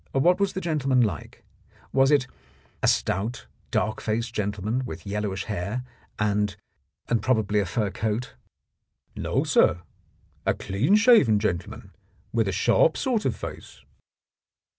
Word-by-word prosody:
"What 175 +8 +3
was 200 -1 +1
the 190 - -3
gentleman 135 -7 +1
like? 100 - -3 0.5
Was 135 0 +4
it 145 -4 +4 0.3
— 65 -3 -33
a - - +2
stout, 110 +6 0 0.2
dark 110 0 -1
faced 115 +2 -2
gentleman 105 +3 -2
with 125 - -7
yellowish 100 -1 -2
hair 105 +4 -3 0.3
and 105 -2 0 0.3
— 65 0 -51
and 115 - +1
probably 110 -5 +1
a 100 - 0
fur 105 +1 -1
coat? 110 +4 -2 0.4
" - - -55 0.3
"No, - - 0
sir, 90 +2 +3 0.6
a - - +1
clean 115 - +1
shaven 215 - +6
gentleman 90 -4 -3 0.4
with 115 -2 +2
a - - 0
sharp 120 - +3
sort 245 -5 0
of - - +1
face." - - -9
110 Hz, 145 wpm, -25 LUFS, 100-130 Hz, 0.6 s, shaven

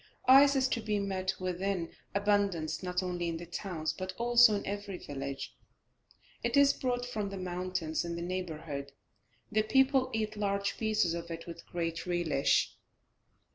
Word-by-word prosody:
Ice 275 +2 +8
is 265 -1 +3
to 230 - -1
be 215 -1 0
met 190 -1 -1
with 185 -1 -3
in 190 -4 -1 0.2
abundance 200 -5 +1
not 180 0 -1
only 175 -1 -2
in 165 - -3
the 175 - -7
towns, 170 -3 -3
but 185 +3 -5
also 240 -2 +6
in 200 - -3
every 200 -1 -4
village. 140 -2 -6 0.9
It - - +1
is 280 0 +6
brought 245 -1 -1
from 215 -5 -3
the 195 - -6
mountains 180 -3 -2
in 170 0 -4
the 170 - -4
neighbourhood, 160 -6 -4 0.6
the 215 0 +3
people 265 +3 +3
eat 215 -1 -2
large 200 -1 -1
pieces 215 -6 +2
of 170 0 -5
it 165 0 -6
with 170 -1 -9
great 165 0 -3
relish. 175 -5 +2
185 Hz, 165 wpm, -31 LUFS, 170-215 Hz, 0.9 s, Ice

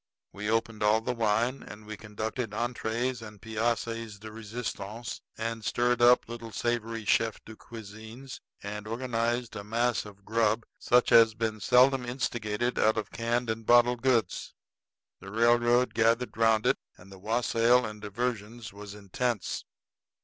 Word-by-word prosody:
We 105 +1 -4
opened 115 -1 0
all 105 +1 +4
the 125 - -2
wine, 115 +3 +1
and 105 0 -11
we 110 0 -6
concocted 110 +3 -4
entrées 120 +1 -2
and 105 -2 -10
pièces 115 0 -2
de 110 +1 -9
resistance, 110 0 -6 0.2
and 115 0 -3
stirred 120 +2 +1
up 120 +1 +6
little 115 -1 -7
savory 115 0 -2
chef 110 +1 +2
de 110 - -10
cuisines 110 +4 -10 0.2
and 105 +1 -6
organized 120 0 -1
a 100 - -5
mass 115 +2 0
of 100 -1 -13
grub 115 0 +1
such 125 0 +3
as - - +9
has 115 -1 +4
been 110 -1 -2
seldom 125 +4 +4
instigated 120 -2 -2
out 110 +1 +3
of 110 - -3
canned 120 +1 -1
and 110 0 -6
bottled 120 0 +5
goods. 120 -8 0 0.6
The 95 - -10
railroad 120 +2 +3
gathered 115 +2 +2
around 115 -1 +3
it, - - +3 0.2
and 95 +2 -16
the 95 - -12
wassail 115 +3 +2
and 105 -1 -7
diversions 110 +1 -4
was 100 0 -9
intense. 105 +2 -2
115 Hz, 150 wpm, -29 LUFS, 105-120 Hz, 0.6 s, as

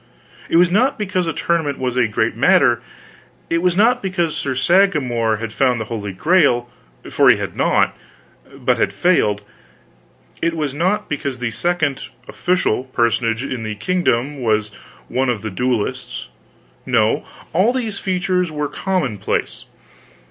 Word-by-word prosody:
It - - 0
was 175 0 +5
not 255 +8 +2
because 185 -4 -1
a - - +1
tournament 160 -4 -1
was 125 -1 -2
a 125 -2 +3
great 105 - -1
matter, - - +4 0.7
it 165 - +2
was 180 0 +1
not 240 +4 +4
because 175 -5 -1
Sir 130 -2 -2
Sagramor 130 - +2
had 115 0 -6
found 125 -2 +2
the 110 - -3
Holy 105 -3 -5
Grail, 120 - +2 0.4
for - - +5
he - - +6
had - - -5
not, - - +2 0.6
but 125 -3 0
had - - +1
failed; 105 - +2 1.0
it 165 0 0
was 150 -4 -2
not 190 +8 0
because 140 -3 -3
the 125 -2 -3
second 155 -1 -1 0.2
(official) 175 -9 0
personage 115 -1 0
in 130 -3 -4
the 110 -1 -4
kingdom 145 - 0
was 110 -2 0 0.4
one 130 +1 0
of 115 -4 -2
the 110 - -4
duellists; 120 - -2 0.5
no, - - +1 0.3
all 190 +8 +3
these 230 -5 -3
features 180 -1 0
were 150 -1 -2
commonplace. 165 - -2
140 Hz, 150 wpm, -19 LUFS, 120-180 Hz, 1.0 s, he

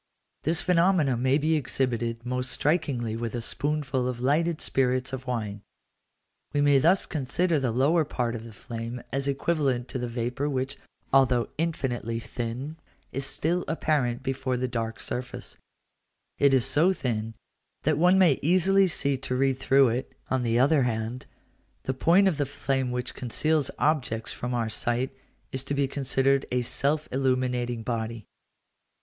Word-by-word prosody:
This 160 +2 0
phenomenon 170 -8 +3
may 130 +2 +3
be 155 +2 +1
exhibited 120 -5 -1
most 125 0 -1
strikingly 135 -8 0
with 115 +1 -4
a - - -1
spoonful 135 0 -1
of 125 -2 -3
lighted 155 +6 +1
spirits 130 0 +1
of 130 0 -5
wine. 105 -5 -3 0.9
We 145 - +1
may 145 -1 +5
thus 175 +7 +3
consider 160 +3 0
the 130 -2 0
lower 145 +8 +3
part 125 -5 -2
of 115 -2 -6
the 115 - -10
flame 115 +2 -6
as 135 +1 0
equivalent 140 -3 0
to 130 - -3
the 125 - -2
vapour 120 +4 -2
which, 135 0 -2 0.4
although 130 -3 +4
infinitely 125 -8 -1
thin, 125 +6 -5 0.3
is 135 +1 -2
still 175 +3 0
apparent 145 -7 0
before 130 -1 -1
the 130 +1 -1
dark 115 -2 -3
surface; 125 0 -5 0.8
it 140 - +5
is 130 -3 +3
so 170 +6 +3
thin, 115 -7 -3 0.5
that 155 0 +1
one 180 +3 +5
may 175 -8 +5
easily 185 +4 +4
see 140 -5 0
to 125 -1 -3
read 135 0 +1
through 135 -1 +4
it: 125 +3 -3 0.2
on 130 -1 +2
the 115 -1 +1
other 140 +4 +4
hand, 115 0 -2 0.6
the 130 - -1
point 175 +9 +4
of 175 -6 +1
the 145 - 0
flame 135 -2 -1
which 125 0 -3
conceals 145 +5 0
objects 125 -7 0
from 125 0 -3
our 115 -2 0
sight 120 +4 -1 0.4
is 130 0 -2
to 140 +1 -2
be 140 -1 +1
considered 135 0 +1
as 125 - +1
a - - +2
self 145 +5 0
illuminating 125 -3 0
body. 115 -2 -3
130 Hz, 160 wpm, -27 LUFS, 120-145 Hz, 0.9 s, may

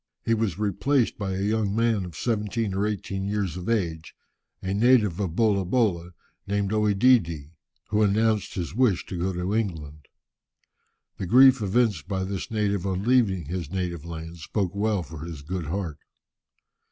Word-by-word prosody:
He 115 - +2
was 110 -6 0
replaced 110 +6 0
by 95 -2 -2
a 95 - -2
young 105 -1 0
man 115 -4 +1
of 85 -3 -9
seventeen 110 -2 -1
or 100 +2 0
eighteen 95 -2 -3
years 100 -4 -1
of 90 +3 -5
age, 85 -8 -2 0.4
a 95 +1 -3
native 105 -4 +3
of 90 -5 -2
Bolabola, 100 -4 +1 0.3
named 100 0 0
OEdidi, 105 - +2 0.4
who 105 0 +1
announced 105 +1 +1
his 85 -4 -4
wish 110 -6 +2
to 90 - -6
go 95 +2 0
to 90 +2 -2
England. 80 -9 -3 1.1
The 95 - -4
grief 130 +3 +7
evinced 105 -5 +1
by 95 -2 -2
this 95 0 -4
native 100 -4 0
on 95 0 -2
leaving 110 - +2
his 85 0 -4
native 90 -3 -3
land 80 0 -7
spoke 95 +3 -2
well 100 -2 0
for 80 0 -10
his 80 -4 -7
good 85 +1 -4
heart. 85 -3 -3
100 Hz, 160 wpm, -25 LUFS, 85-110 Hz, 1.1 s, grief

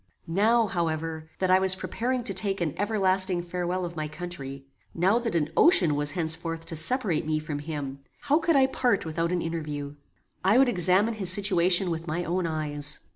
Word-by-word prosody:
Now, 220 +7 +2
however, 160 -3 -3
that 185 -1 0
I 185 - +6
was 190 0 +3
preparing 245 +6 -3
to 195 - +2
take 195 +1 0
an 165 -5 -2
everlasting 190 -3 +1
farewell 180 +1 -3
of 170 0 -7
my 155 -1 -3
country, 150 -5 -7 0.3
now 190 +7 +2
that 230 -6 -3
an 155 -2 0
ocean 180 - +5
was 145 0 -1
henceforth 165 0 -2
to 165 0 -7
separate 175 - +2
me 155 -1 0
from 155 -1 -5
him, 145 -3 -6 0.2
how 290 +2 +2
could 330 -1 +1
I 270 -1 +5
part 245 -7 0
without 165 +2 -2
an 180 -1 -1
interview? 150 -4 -5 0.5
I 195 +5 +4
would 265 -1 +5
examine 190 +2 +2
his 200 -5 -1
situation 185 -2 +3
with 165 +1 -5
my 170 +3 -2
own 175 0 -1
eyes. 150 -2 -3
175 Hz, 185 wpm, -26 LUFS, 160-195 Hz, 0.5 s, I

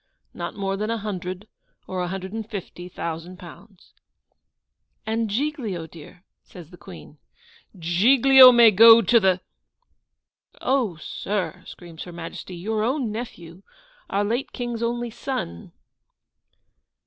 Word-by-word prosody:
Not - - -6
more 195 -1 -3
than 215 +2 -3
a 230 - -1
hundred 190 -1 -6 0.4
or 185 -1 -4
a 180 - -2
hundred 190 +2 -6
and 220 -1 -6
fifty 180 -4 -8
thousand 170 +1 -6
pounds.' 180 +2 -15 1.1
'And 225 0 -1
Giglio, 225 - -3
dear?' 165 +2 -14 0.2
says 175 -2 -14
the 175 - -13
Queen. - - -13 0.6
'GIGLIO 255 +10 +6
MAY 235 -2 +7
GO 225 +3 +8
TO 235 - +4
THE 190 -3 +2 0.6
' - - -41
'Oh, 255 -9 0
sir,' 180 +2 -4
screams 170 -2 -10
Her 175 - -10
Majesty. 170 +2 -8
'Your 215 +5 -2
own 250 -1 -1
nephew! 185 -6 -8 0.5
our 200 - 0
late 235 +6 -2
King's 240 -2 -4
only 240 0 -2
son. 85 - -6
205 Hz, 130 wpm, -23 LUFS, 175-230 Hz, 1.1 s, GO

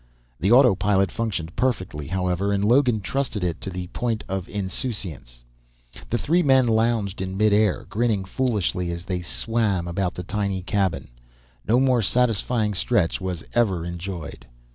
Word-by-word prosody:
The 95 +7 +1
autopilot 100 -6 +4
functioned 95 -8 -3
perfectly, 95 - -1
however, 90 +2 -1
and 100 0 +1
Logan 120 -1 +3
trusted 125 -2 -2
it 85 -2 -2
to - - -4
the 90 -1 -5
point 115 0 -2
of 95 -2 -4
insouciance. 95 - -4 0.7
The 120 - +1
three 170 +8 +2
men 130 -4 +4
lounged 110 -4 +1
in 95 0 -4
midair, 105 -1 +2
grinning 110 -3 0
foolishly 95 -6 -1
as 85 +1 -5
they 90 -2 -2
"swam" 100 -1 -1
about 90 +1 -2
the 90 - -5
tiny 100 -1 -2
cabin. 95 -8 -1 0.6
No 120 +3 +4
more 130 -3 +3
satisfying 115 -1 +1
stretch 95 -1 +1
was 90 -3 -4
ever 95 -8 +1
enjoyed. 85 -7 -6
100 Hz, 145 wpm, -24 LUFS, 90-115 Hz, 0.7 s, autopilot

